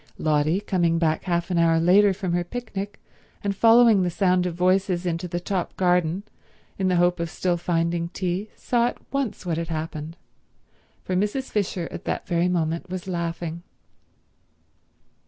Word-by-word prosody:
Lotty, 155 +4 +1
coming 175 -5 +1
back 160 -2 0
half 175 0 -1
an 175 - +2
hour 165 -1 +4
later 195 +5 +5
from 190 -2 -3
her 175 0 +1
picnic, 205 0 -6 0.4
and 200 -1 -1
following 225 -1 +6
the 180 - +1
sound 180 0 +2
of 170 - -4
voices 185 0 +1
into 170 +1 -2
the 175 0 -3
top 180 0 -3
garden 180 0 +2 0.6
in 190 - +1
the 185 - +2
hope 175 0 +2
of 170 -1 -2
still 180 +2 0
finding 170 0 -1
tea, 185 +3 -3
saw 240 -1 +1
at - - -8
once 275 -8 -2
what 165 -2 -1
had 170 - -3
happened, 160 0 -5 0.9
for 185 - -2
Mrs. 210 +8 -1
Fisher 190 -4 -1
at - - -8
that - - -2
very 170 +1 +1
moment 170 0 -1
was 185 0 -5
laughing. 170 -1 -3
180 Hz, 165 wpm, -24 LUFS, 170-195 Hz, 0.9 s, following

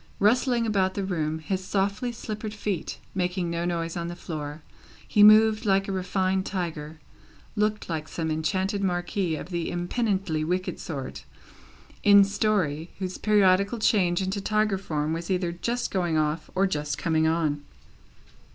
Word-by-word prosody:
Rustling 235 +3 +3
about 195 -4 +1
the 200 - -1
room, 160 -5 -1
his 185 +4 -3
softly 200 +5 -1
slippered 215 -2 -6
feet 200 -5 -3 0.2
making 180 -2 -1
no 170 0 -2
noise 165 -1 -2
on 170 -1 -3
the 175 - -5
floor, 150 -3 -6 0.4
he 210 - +3
moved 215 +1 +7
like 195 -2 +2
a - - -2
refined 190 0 0
tiger: 160 -5 -4 0.6
looked 210 0 0
like 155 -2 -3
some 160 -1 -3
enchanted 190 +6 -1
marquis 175 -1 -1
of 155 - -7
the 170 -2 -2
impenitently 175 -3 -1
wicked 180 +3 -2
sort, 140 -5 -6 0.8
in 200 -1 +7
story, 195 -6 0
whose 185 -1 -4
periodical 200 +1 +3
change 190 -5 +2
into 190 +2 -2
tiger 215 -1 +1
form 155 -4 -2
was 165 +1 -5
either 180 -2 0
just 235 +8 -2
going 175 -4 0
off, 155 +1 -1
or 190 +1 +3
just 150 -5 -2
coming 160 -2 +1
on. 155 -3 0
185 Hz, 150 wpm, -26 LUFS, 165-200 Hz, 0.8 s, moved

